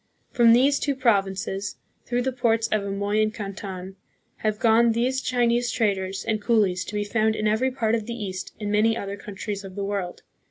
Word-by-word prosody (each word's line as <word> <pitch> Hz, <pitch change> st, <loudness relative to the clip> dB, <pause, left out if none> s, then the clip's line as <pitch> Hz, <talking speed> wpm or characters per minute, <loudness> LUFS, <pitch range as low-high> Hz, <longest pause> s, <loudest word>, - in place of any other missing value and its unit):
From 235 Hz, -2 st, +5 dB
these 275 Hz, +4 st, +4 dB
two 285 Hz, -2 st, 0 dB
provinces, 195 Hz, -4 st, 0 dB, 0.3 s
through 245 Hz, 0 st, 0 dB
the 265 Hz, -, 0 dB
ports 230 Hz, -3 st, +1 dB
of 215 Hz, -1 st, +1 dB
Amoy 200 Hz, +2 st, 0 dB
and 215 Hz, 0 st, +1 dB
Canton, 195 Hz, -2 st, -7 dB, 0.4 s
have 215 Hz, -1 st, -1 dB
gone 230 Hz, 0 st, +4 dB
those 255 Hz, +3 st, 0 dB
Chinese 240 Hz, -1 st, +1 dB
traders 195 Hz, -4 st, -1 dB
and 215 Hz, -1 st, -1 dB
coolies 205 Hz, -5 st, +2 dB
to 210 Hz, -, -7 dB
be 205 Hz, -, 0 dB
found 220 Hz, +1 st, +1 dB
in 215 Hz, -, 0 dB
every 220 Hz, +5 st, +2 dB
part 230 Hz, -4 st, -1 dB
of 225 Hz, -2 st, -1 dB
the 235 Hz, -, -4 dB
East 190 Hz, -5 st, -6 dB
and 205 Hz, -1 st, -3 dB
many 220 Hz, +2 st, +3 dB
other 200 Hz, -2 st, -4 dB
countries 200 Hz, 0 st, -6 dB
of 190 Hz, -1 st, -9 dB
the 200 Hz, -, -3 dB
world. 195 Hz, -3 st, -4 dB
215 Hz, 195 wpm, -25 LUFS, 200-235 Hz, 0.4 s, From